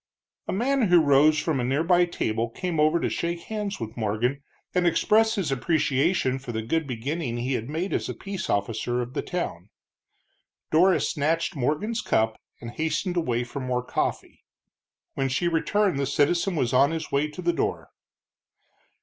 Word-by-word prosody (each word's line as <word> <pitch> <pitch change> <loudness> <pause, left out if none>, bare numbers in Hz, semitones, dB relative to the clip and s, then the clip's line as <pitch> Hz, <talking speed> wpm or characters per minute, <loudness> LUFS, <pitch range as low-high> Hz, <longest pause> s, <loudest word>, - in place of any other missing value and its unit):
A - - -1
man 250 +3 +1
who 175 -1 +6
rose 150 0 +5
from 150 -3 0
a - - 0
near 135 +5 +1
by 175 +1 +4
table 115 -9 -2
came 170 +6 -3
over 155 +3 +4
to - - 0
shake 170 0 -2
hands 210 0 -4
with 115 0 -6
Morgan, 115 +5 -1 0.3
and 180 -1 +2
express 220 +6 +3
his 185 -9 -1
appreciation 140 0 +1
for 130 -2 -7
the 110 -1 -3
good 160 +6 -1
beginning 130 +1 -3
he 125 +3 -1
had 120 0 -3
made 165 +6 -2
as - - -1
peace 195 -1 -5
officer 115 +4 -1
of 120 +1 -9
the - - -1
town. 100 - -4 1.0
Dora 180 +4 +5
snatched 165 +4 0
Morgan's 155 - -1
cup 110 0 0 0.2
and 115 0 -7
hastened 160 +6 -2
away 125 -8 0
for 125 +3 -6
more 125 -1 -1
coffee. - - -3 0.7
When 135 0 -1
she 155 +7 0
returned 175 0 +1
the 140 - 0
citizen 170 +7 +1
was 125 -6 0
on 135 +3 +5
his 160 -1 -4
way 140 +2 +1
to 155 +4 -8
the 175 0 +2
door. 155 - -2
150 Hz, 175 wpm, -25 LUFS, 125-175 Hz, 1.0 s, who